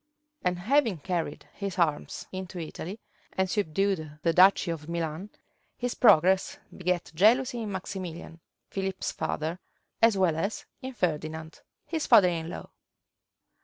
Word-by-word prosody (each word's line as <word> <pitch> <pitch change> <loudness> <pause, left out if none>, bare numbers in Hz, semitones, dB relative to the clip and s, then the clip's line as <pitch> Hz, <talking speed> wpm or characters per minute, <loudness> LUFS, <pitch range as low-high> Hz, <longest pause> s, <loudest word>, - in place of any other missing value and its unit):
and 180 -1 +1
having 230 - +2
carried 165 -1 -3
his 200 -2 -5
arms 155 -4 0
into 185 -1 -6
Italy, 175 +5 -6 0.3
and 190 0 +1
subdued 180 -5 -1
the 165 - +3
duchy 185 0 +5
of 160 -1 -6
Milan, 170 +3 -3 0.5
his 245 0 -2
progress 190 -3 +4 0.2
begat 180 -1 -1
jealousy 235 +7 +3
in 215 -2 -4
Maximilian, 180 -3 -6 0.3
Philip's 190 -1 -2
father, 160 +4 -3 0.4
as 225 -3 +5
well 180 -4 +3
as 195 +7 -2 0.2
in 260 +1 -6
Ferdinand, 160 -4 -3 0.2
his 320 0 -2
father 185 -3 +7
in 165 -1 -3
law. - - -8
180 Hz, 130 wpm, -28 LUFS, 165-200 Hz, 0.5 s, father